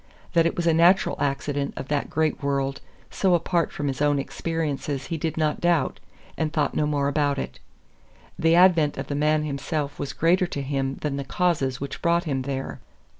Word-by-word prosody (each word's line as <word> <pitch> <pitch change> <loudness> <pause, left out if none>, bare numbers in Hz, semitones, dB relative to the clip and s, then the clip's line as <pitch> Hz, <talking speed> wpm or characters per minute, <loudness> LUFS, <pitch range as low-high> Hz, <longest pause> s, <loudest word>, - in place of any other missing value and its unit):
That 165 -1 +4
it - - -2
was 175 - -2
a 165 - +4
natural 175 +4 +4
accident 140 0 -1
of 135 - -5
that 145 -1 -1
great 155 0 0
world 140 -1 -1 0.3
so 185 -3 +2
apart 170 0 0
from 145 - -3
his 135 0 -3
own 145 -1 +3
experiences 145 -2 -3
he - - +1
did 160 +1 -3
not 155 -1 0
doubt, 175 -2 +1 0.4
and 155 -1 0
thought 150 -3 0
no 150 - +1
more 145 -2 0
about 145 -1 +1
it. 65 - -5 0.8
The 165 +1 +4
advent 170 -5 +5
of 135 0 -5
the - - -1
man 150 +1 +2
himself 145 0 -3
was 140 - -3
greater 180 +3 +2
to 140 -4 -4
him 135 -1 -1
than 145 -2 -2
the 140 - -3
causes 135 -4 0
which 140 - -6
brought 170 0 +2
him 140 -6 -1
there. 135 0 -4
150 Hz, 195 wpm, -25 LUFS, 140-165 Hz, 0.8 s, advent